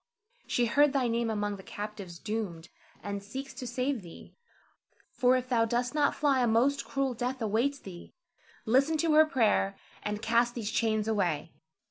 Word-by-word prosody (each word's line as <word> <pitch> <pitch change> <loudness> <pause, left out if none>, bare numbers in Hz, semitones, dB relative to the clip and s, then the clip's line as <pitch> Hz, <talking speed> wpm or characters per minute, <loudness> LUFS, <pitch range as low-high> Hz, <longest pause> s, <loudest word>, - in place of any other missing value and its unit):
She 240 - +1
heard 285 +5 +4
thy 265 -3 +2
name 230 0 0
among 205 -2 -2
the - - -10
captives 205 -3 -7
doomed, 190 -6 -4 0.3
and 200 0 -4
seeks 265 +7 -7
to 255 -1 -7
save 250 +1 -1
thee; 170 -3 -13 0.8
for 250 0 +3
if 255 0 -1
thou 235 -3 +2
dost 240 +3 -1
not 295 -2 +2
fly, 275 -3 +2
a 245 - +3
most 255 +5 +2
cruel 275 -2 -1
death 250 +3 -3
awaits 230 +6 0
thee. 185 -8 -11 0.5
Listen 275 +7 +3
to 320 0 +2
her 310 +1 +7
prayer, 220 -7 +2 0.3
and 210 0 -3
cast 235 +2 +2
these 225 -3 -3
chains 220 -2 +1
away. 175 -8 0
235 Hz, 170 wpm, -29 LUFS, 210-265 Hz, 0.8 s, her